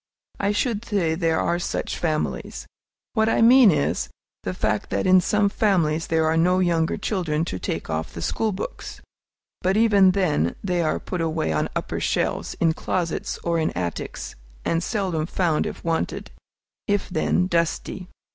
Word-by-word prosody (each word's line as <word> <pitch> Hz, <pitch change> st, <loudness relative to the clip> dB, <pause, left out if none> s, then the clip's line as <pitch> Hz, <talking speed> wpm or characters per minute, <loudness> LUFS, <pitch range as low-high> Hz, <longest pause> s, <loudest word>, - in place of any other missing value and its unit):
I 200 Hz, 0 st, +1 dB
should 215 Hz, +1 st, -1 dB
say 195 Hz, -8 st, 0 dB
there 165 Hz, -1 st, +1 dB
are 170 Hz, +1 st, 0 dB
such -, -, -3 dB
families. 155 Hz, -3 st, -2 dB, 0.5 s
What 220 Hz, -1 st, +2 dB
I 225 Hz, -, +3 dB
mean 245 Hz, -1 st, +8 dB
is, 150 Hz, -5 st, 0 dB, 0.3 s
the 90 Hz, -, -4 dB
fact 105 Hz, +1 st, -1 dB
that -, -, -1 dB
in 185 Hz, 0 st, +6 dB
some 210 Hz, +3 st, +2 dB
families 170 Hz, -7 st, +1 dB
there 160 Hz, -1 st, +2 dB
are 160 Hz, +1 st, +2 dB
no 180 Hz, +3 st, +3 dB
younger 170 Hz, -3 st, +1 dB
children 165 Hz, -6 st, -1 dB
to 95 Hz, -, -4 dB
take -, -, -3 dB
off 80 Hz, +1 st, -3 dB
the 85 Hz, -, -5 dB
school 220 Hz, -1 st, 0 dB
books. 195 Hz, +1 st, -6 dB, 0.6 s
But 190 Hz, +2 st, +1 dB
even 205 Hz, -4 st, +5 dB
then 150 Hz, -, +1 dB
they 180 Hz, -3 st, 0 dB
are 155 Hz, -, 0 dB
put 180 Hz, -2 st, -4 dB
away 160 Hz, -, -1 dB
on 75 Hz, -, 0 dB
upper -, -, -2 dB
shelves, -, -, -1 dB
in 165 Hz, -1 st, +2 dB
closets 170 Hz, 0 st, -2 dB
or 170 Hz, -1 st, +1 dB
in 160 Hz, -, +1 dB
attics, 85 Hz, -2 st, -4 dB, 0.3 s
and 165 Hz, 0 st, +1 dB
seldom 180 Hz, -6 st, -1 dB
found 170 Hz, -4 st, 0 dB
if -, -, -7 dB
wanted, 165 Hz, -1 st, -2 dB, 0.6 s
if 205 Hz, -1 st, 0 dB
then, 180 Hz, 0 st, +1 dB
dusty. 170 Hz, +1 st, -1 dB
170 Hz, 165 wpm, -23 LUFS, 160-195 Hz, 0.6 s, mean